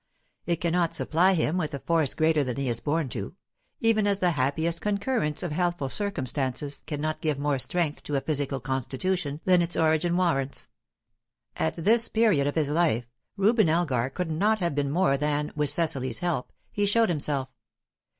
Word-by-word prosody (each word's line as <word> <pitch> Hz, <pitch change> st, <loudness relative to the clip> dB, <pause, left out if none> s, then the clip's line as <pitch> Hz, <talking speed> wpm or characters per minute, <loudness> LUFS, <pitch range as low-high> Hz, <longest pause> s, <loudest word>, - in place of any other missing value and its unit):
It 170 Hz, -, +2 dB
cannot 170 Hz, 0 st, 0 dB
supply 180 Hz, +4 st, +2 dB
him 160 Hz, +1 st, 0 dB
with 155 Hz, -5 st, -2 dB
a -, -, -5 dB
force 160 Hz, -4 st, +1 dB
greater 155 Hz, -2 st, +3 dB
than 125 Hz, -2 st, -3 dB
he 140 Hz, -1 st, -1 dB
is 120 Hz, -2 st, -1 dB
born 150 Hz, +4 st, 0 dB
to; 100 Hz, -, -5 dB, 0.5 s
even 220 Hz, -2 st, +3 dB
as 200 Hz, -1 st, +2 dB
the 180 Hz, -2 st, +2 dB
happiest 160 Hz, +4 st, 0 dB
concurrence 200 Hz, -, -1 dB
of 175 Hz, -, -3 dB
healthful 170 Hz, -3 st, -1 dB
circumstances 140 Hz, -, -2 dB
cannot 155 Hz, +1 st, -3 dB
give 155 Hz, -4 st, 0 dB
more 140 Hz, -1 st, 0 dB
strength 160 Hz, +2 st, -2 dB
to 145 Hz, -, -2 dB
a 135 Hz, -, +1 dB
physical 145 Hz, -3 st, -1 dB
constitution 140 Hz, +5 st, -2 dB
than 180 Hz, -2 st, +5 dB
its 170 Hz, 0 st, -2 dB
origin 160 Hz, +2 st, +2 dB
warrants. 140 Hz, -7 st, 0 dB, 0.9 s
At 160 Hz, 0 st, -1 dB
this 220 Hz, +7 st, +2 dB
period 210 Hz, -11 st, +2 dB
of 145 Hz, -, -2 dB
his 150 Hz, -3 st, +1 dB
life, 150 Hz, -8 st, +2 dB, 0.3 s
Reuben 210 Hz, -2 st, +4 dB
Elgar 145 Hz, -7 st, +1 dB
could 170 Hz, +3 st, -3 dB
not 205 Hz, +8 st, +2 dB
have 175 Hz, -6 st, -1 dB
been 140 Hz, 0 st, 0 dB
more 160 Hz, -2 st, +2 dB
than, 150 Hz, +1 st, -1 dB
with 150 Hz, -1 st, +1 dB
Cecily's 140 Hz, -6 st, -1 dB
help, 175 Hz, -7 st, -2 dB, 0.2 s
he 205 Hz, 0 st, 0 dB
showed 225 Hz, +1 st, +3 dB
himself. 145 Hz, -4 st, -1 dB
155 Hz, 175 wpm, -27 LUFS, 140-180 Hz, 0.9 s, than